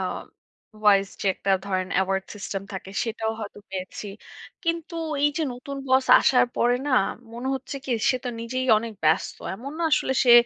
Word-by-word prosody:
আ - - -1 0.8
vice 200 -1 +5
যে - - -2
একটা 195 - -2 0.2
ধরেন 185 -1 -1
অ্যাওয়ার্ড 190 0 +1
সিস্টেম 195 -1 -4
থাকে 190 0 -6
সেটাও 225 -1 -2
হয়তো 205 -1 -7
পেয়েছি। 190 +2 -5 0.6
কিন্তু 335 0 -2 0.3
এই 295 - +5
যে 320 - +1
নতুন 275 +3 -7
বস 260 0 +4
আসার 250 -1 +4
পরে 245 +1 +3
না 270 - 0 0.4
মনে 250 +3 -4
হচ্ছে 270 +1 -5
কি 260 - -5 0.2
সে 255 - +1
তো - - -1
নিজেই 255 +3 -2
অনেক 230 0 -5
ব্যস্ত। 155 - +2 0.2
এমন 270 +6 -7
না - - -1
আসলে 265 - +3
সে 240 - +7
230 Hz, 180 wpm, -25 LUFS, 195-260 Hz, 0.8 s, সে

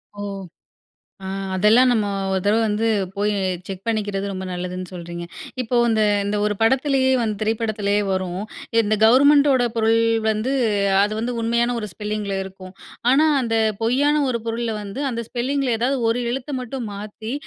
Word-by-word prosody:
ஓ! - - -11 1.1
அ - - -5 0.3
அதெல்லாம் 220 +7 +5
நம்ம 220 -4 +1 0.2
ஒரு 190 0 0
தடவை 210 +3 +3
வந்து 215 +1 0 0.3
போய் 205 +1 +1 0.3
செக் 190 -1 -7
பண்ணிக்கிறது, 205 -3 -1
ரொம்ப 190 0 -5
நல்லதுன்னு 180 0 -5
சொல்றீங்க. 170 -1 -7 0.4
இப்போ 245 +1 -4
அந்த 220 -1 +2 0.2
அந்த 205 +1 -1
ஒரு 210 0 +1
படத்திலேயே 265 +2 +2
வந்து 215 -3 -1
திரைப்படத்திலேயே 215 -2 0
வரும். 185 -1 -2 0.4
இந்த 215 -1 +1
கவர்மெண்டோட 275 +2 +5
பொருள் 225 0 +3 0.3
வந்து, 220 +5 -1 0.5
அது 205 +1 0
வந்து 235 +3 -2
உண்மையான 235 +1 +1
ஒரு 210 - -5
ஸ்பெல்லிங்கில 210 +1 -3
இருக்கும். 190 -1 -11 0.4
ஆனா, 290 +4 +5 0.2
அந்த 230 -2 -1 0.3
பொய்யான 285 +6 +2
ஒரு 235 -2 -2
பொருள்ல 230 0 -2
வந்து, 205 +6 -6
அந்த 235 -1 -3
ஸ்பெல்லிங்கில 260 0 -1
ஏதாவது 260 +4 0
ஒரு 230 +2 +1
எழுத்தை 270 +3 -4
மட்டும் 250 -1 -5
மாத்தி, 215 +3 -7
225 Hz, 150 wpm, -22 LUFS, 205-245 Hz, 1.1 s, அதெல்லாம்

